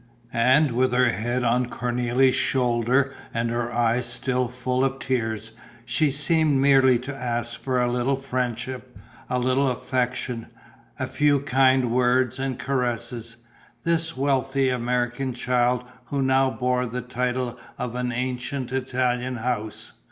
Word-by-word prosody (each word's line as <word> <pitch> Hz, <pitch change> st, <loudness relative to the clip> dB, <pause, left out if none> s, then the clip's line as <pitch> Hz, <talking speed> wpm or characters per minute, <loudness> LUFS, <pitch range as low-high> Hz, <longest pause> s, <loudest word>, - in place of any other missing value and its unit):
And, 130 Hz, +5 st, +4 dB
with 125 Hz, +1 st, +1 dB
her 125 Hz, 0 st, +4 dB
head 120 Hz, +3 st, -2 dB
on 125 Hz, +1 st, +2 dB
Cornélie's 125 Hz, +2 st, +1 dB
shoulder 125 Hz, +1 st, +1 dB, 0.2 s
and 115 Hz, 0 st, 0 dB
her 120 Hz, 0 st, -2 dB
eyes 120 Hz, +1 st, +1 dB
still 125 Hz, +1 st, 0 dB
full 125 Hz, +1 st, -1 dB
of 135 Hz, 0 st, 0 dB
tears, 115 Hz, -4 st, -2 dB, 0.3 s
she 145 Hz, +6 st, +2 dB
seemed 150 Hz, +1 st, +2 dB
merely 135 Hz, -2 st, +5 dB
to 135 Hz, +4 st, -6 dB
ask 120 Hz, -2 st, -3 dB
for 130 Hz, -2 st, 0 dB
a 120 Hz, 0 st, +1 dB
little 125 Hz, +3 st, +1 dB
friendship, 125 Hz, -1 st, -4 dB, 0.3 s
a 125 Hz, -, 0 dB
little 130 Hz, +2 st, +2 dB
affection, 125 Hz, -2 st, -2 dB, 0.5 s
a -, -, -2 dB
few 145 Hz, -1 st, +2 dB
kind 130 Hz, -2 st, +3 dB
words 125 Hz, +1 st, +2 dB
and 135 Hz, -1 st, -2 dB
caresses, 120 Hz, -3 st, -2 dB, 0.5 s
this 165 Hz, -3 st, 0 dB
wealthy 135 Hz, 0 st, +1 dB
American 125 Hz, +1 st, -1 dB
child 125 Hz, 0 st, +1 dB, 0.2 s
who 140 Hz, -1 st, -1 dB
now 135 Hz, 0 st, +3 dB
bore 125 Hz, -1 st, 0 dB
the 125 Hz, +2 st, -4 dB
title 125 Hz, 0 st, -2 dB, 0.2 s
of 125 Hz, -1 st, -4 dB
an 125 Hz, 0 st, -2 dB
ancient 125 Hz, +1 st, -3 dB
Italian 125 Hz, -1 st, -1 dB
house. 110 Hz, -2 st, -3 dB
125 Hz, 135 wpm, -24 LUFS, 120-130 Hz, 0.5 s, merely